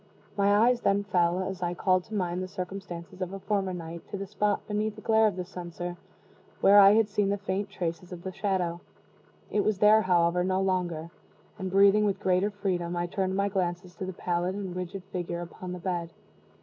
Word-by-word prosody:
My 200 0 +3
eyes 245 -1 +2
then 200 +1 +2
fell, 180 -2 +1
as 190 -1 -5
I 175 0 -1
called 185 0 +2
to 220 - -7
mind 180 -2 -1
the 185 - -3
circumstances 185 -1 -7
of 185 +1 -3
a 195 - -5
former 195 -1 -1
night, 170 -1 -6
to 200 - -4
the 195 - -4
spot 205 +1 -1
beneath 210 0 -1
the 215 - -11
glare 220 0 +4
of 205 - -1
the 180 -1 -4
censer 175 -1 -6 0.6
where 200 +1 +7
I 200 0 +9
had 220 -1 +4
seen 205 -1 0
the 200 - +1
faint 200 0 -3
traces 175 -1 -4
of 175 -1 -8
the 190 - -4
shadow. 185 -3 -1 0.7
It 205 - +2
was 215 -2 +1
there, 210 +2 +6
however, 175 -2 +2
no 185 +1 +1
longer; 175 -4 -1 0.5
and 190 -1 -3
breathing 200 +2 +5
with 200 -2 0
greater 185 +2 +2
freedom, 180 -4 -2
I 175 - 0
turned 190 +1 -1
my 200 +1 +1
glances 180 -2 -2
to 190 - -4
the 185 - -5
pallid 175 +1 -1
and 190 -3 -5
rigid 185 +1 -5
figure 175 -1 -3
upon 180 +1 -7
the 180 - -4
bed. 175 -2 -3
185 Hz, 210 wpm, -28 LUFS, 175-200 Hz, 0.7 s, I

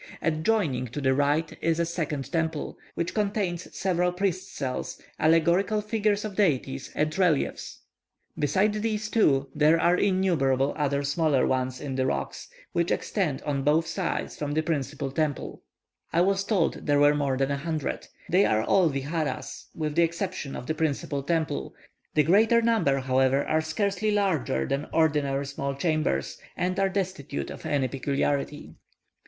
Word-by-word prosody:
Adjoining 155 - +1
to 120 +6 -6
the 130 -2 +2
right 145 +4 +1
is 165 0 +1
a 170 - +2
second 150 -5 -3
temple, 160 -2 -2 0.2
which 170 +1 -2
contains 200 -4 -1
several 180 -2 +1
priests' 185 +1 -2
cells, 130 -3 -4 0.2
allegorical 170 +7 +3
figures 210 -1 0
of 205 -3 -5
deities, 135 -8 0
and 155 +1 0
reliefs. 170 -7 0 0.5
Besides 205 +8 +1
these 215 -1 -2
two, 140 -11 +3
there 155 +2 +4
are 175 - +4
innumerable 170 -9 +2
other 140 -1 0
smaller 145 -1 +2
ones 130 -1 -1
in 135 -3 -4
the 130 0 +1
rocks, - - -3 0.2
which 170 0 0
extend 170 -10 -1
on 140 -2 -1
both 150 +4 +3
sides 165 +2 -3
from 145 -1 -3
the 155 +1 +1
principal 140 -3 -2
temple; 150 -1 -2 0.5
I 170 - +3
was 195 +1 +2
told 195 -6 0
there 145 -1 +4
were 145 0 +6
more 140 -3 0
than 135 +1 0
a 140 - 0
hundred. 155 0 -3 0.2
They 185 +3 +4
are 110 0 +2
all 180 +6 +4
viharas 145 +1 -3
with 155 -2 -2
the 170 - +3
exception 170 -3 -2
of - - -6
the 155 - -1
principal 150 -2 -1
temple; 155 - -2 0.4
the 150 - +5
greater 220 +8 +5
number, 220 -12 +2
however, 130 +1 +2
are 155 0 +1
scarcely 200 +6 -1
larger 185 - +1
than 140 +2 -2
ordinary 145 -3 +1
small 140 0 -3
chambers, 155 - -1 0.2
and 180 +2 -1
are 195 0 +3
destitute 185 -8 -3
of - - -7
any 140 -3 +1
peculiarity. 140 - -2
155 Hz, 160 wpm, -27 LUFS, 140-185 Hz, 0.5 s, were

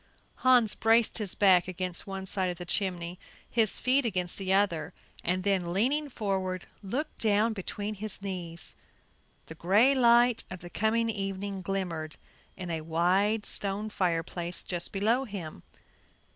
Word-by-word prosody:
Hans 250 -4 +4
braced 225 +1 +3
his 205 -4 -1
back 185 -3 +5
against 185 0 -3
one 195 -1 -5
side 190 -1 0
of 175 - -4
the 175 - -7
chimney, 175 -1 -1 0.3
his 225 -3 +1
feet 265 +2 +2
against 185 -6 -2
the 190 -1 -2
other 180 -4 +1 0.3
and 180 +1 0
then, 185 -3 0
leaning 280 +9 +1
forward, 190 -6 -2 0.2
looked 260 +10 -4
down 220 +1 +3
between 205 +1 -4
his 210 0 -4
knees. 180 -4 -4 0.7
The - - -9
gray 205 - +4
light 240 -2 +4
of 185 0 -8
the 175 0 -10
coming 225 +2 +1
evening 195 -1 -4
glimmered 175 -5 -3 0.4
in 180 -2 -5
a 160 -1 -2
wide 185 +7 +1
stone 205 +2 -2
fireplace 175 -1 -2
just 175 -2 -3
below 225 +7 +1
him. 180 - -7
195 Hz, 145 wpm, -29 LUFS, 180-220 Hz, 0.7 s, back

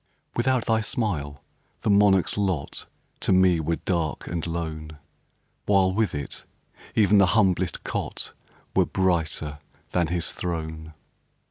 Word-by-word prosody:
Without 130 0 +1
thy 110 -1 +2
smile, 80 - -2 0.4
the - - 0
monarch's 100 -2 +4
lot 95 -8 -2 0.3
To - - 0
me 95 -2 +5
were 80 +1 0
dark 85 -3 -2
and 85 -1 -3
lone, 80 -2 -4 0.7
While, 95 -2 +4
with 105 -5 +1
it, 70 -1 -5 0.5
even 105 -1 +5
the 100 - +6
humblest 95 -4 +2
cot - - -4 0.4
Were - - +4
brighter 80 -5 0 0.3
than 85 -2 +2
his 85 0 -2
throne. 80 -2 -5
90 Hz, 125 wpm, -25 LUFS, 80-100 Hz, 0.7 s, the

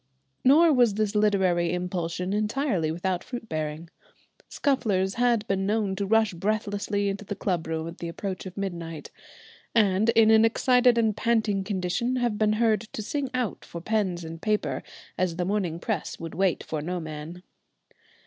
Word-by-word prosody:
Nor 310 +5 +6
was 240 -6 +4
this 215 -1 0
literary 190 -5 +2
impulsion 180 0 -2
entirely 210 - 0
without 175 +2 -2
fruit 240 -3 -7
bearing. 155 0 -4 0.6
Scufflers 200 -9 0
had 235 -3 +2
been 195 0 0
known 210 -2 0
to 200 0 -2
rush 220 -1 +3
breathlessly 205 +1 -1
into 200 +1 -3
the 205 0 -5
club 175 -6 -2
room 160 0 -3
at 170 - -9
the 170 - -4
approach 190 +3 -5
of 185 - -10
midnight, 170 -5 -5 0.6
and 210 0 +3
in 225 -1 +5
an 220 0 +6
excited 245 +1 +4
and 220 -3 +2
panting 220 -4 +1
condition 190 +5 -1
have 240 -4 0
been 215 -1 +3
heard 220 -2 +2
to 215 - -4
sing 275 +4 -2
out 250 -5 -2
for 170 - -8
pens 190 -3 -1
and 165 0 -8
paper, 215 -1 0 0.4
as 180 -2 0
the 180 +1 -1
morning 185 -4 -1
press 170 - -3
would 165 -1 -6
wait 185 +1 +1
for 155 -2 -4
no 180 +4 -3
man. 160 +2 -7
200 Hz, 170 wpm, -26 LUFS, 175-220 Hz, 0.6 s, Nor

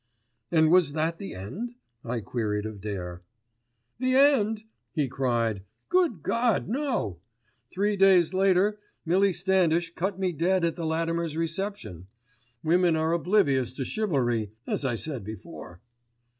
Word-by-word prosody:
"And 160 -2 +4
was 175 -5 +4
that 160 +2 -1
the 195 - -7
end?" 195 - -6 0.3
I 120 0 -3
queried 105 -2 -2
of 110 -2 -7
Dare. 90 -4 -5 0.8
"The 255 0 +1
end?" 225 -6 +4 0.3
he 150 -5 0
cried. 120 -6 0 0.3
"Good 340 - +2
God, 235 -3 +1
no! 235 - -2 0.5
Three 205 +2 0
days 190 -3 +5
later 195 +2 +3 0.3
Millie 190 +4 +3
Standish 175 -2 +1
cut 190 +2 -2
me 185 -2 +1
dead 175 +3 +1
at 165 -2 -1
the 165 -2 -3
Latimer's 165 0 -1
reception. 165 - -4 0.6
Women 170 +1 +3
are 160 +1 +1
oblivious 165 - +2
to 130 0 -4
chivalry 125 - 0
as - - -2
I 130 -3 0
said 130 -1 -4
before." 90 -4 -9
165 Hz, 135 wpm, -27 LUFS, 120-195 Hz, 0.8 s, days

